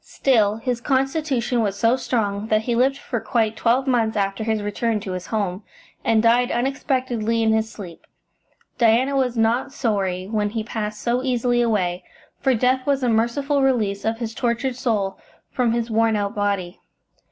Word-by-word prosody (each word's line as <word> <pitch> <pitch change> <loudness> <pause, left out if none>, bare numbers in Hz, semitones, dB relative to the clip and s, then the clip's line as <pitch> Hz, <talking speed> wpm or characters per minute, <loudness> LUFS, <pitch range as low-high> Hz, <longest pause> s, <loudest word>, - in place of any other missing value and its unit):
Still, 215 -6 +2
his 240 +1 -3
constitution 270 -2 0
was 200 -2 -1
so 230 +4 +3
strong 215 -5 -2
that 215 -1 +2
he 240 - -1
lived 265 +3 +2
for 245 -3 -4
quite 225 -1 0
twelve 245 +4 +2
months 230 -4 +1
after 195 +1 -1
his 220 -1 -1
return 215 +2 -1
to 195 -2 -5
his 185 0 -5
home, 200 -3 -2 0.4
and 225 -1 +2
died 240 +2 +4
unexpectedly 245 -3 -1
in 220 0 +3
his 220 0 0
sleep. 180 -5 -10 0.7
Diana 240 +4 +3
was 250 -3 0
not 230 +4 +1
sorry 195 -8 -1
when 210 0 -1
he 220 +1 -3
passed 215 -1 -5
so 240 +1 +1
easily 245 -2 +1
away, 185 -6 0 0.4
for 265 -2 +2
death 255 +3 +1
was 275 -2 +1
a 245 - +2
merciful 255 +6 +1
release 220 -7 +1
of 225 +1 -1
his 230 -1 -4
tortured 240 +3 -1
soul 210 -6 -1 0.3
from 245 -3 +1
his 235 0 -1
worn 225 0 +2
out 200 -1 -1
body. 200 -3 -2
230 Hz, 175 wpm, -22 LUFS, 210-250 Hz, 0.7 s, died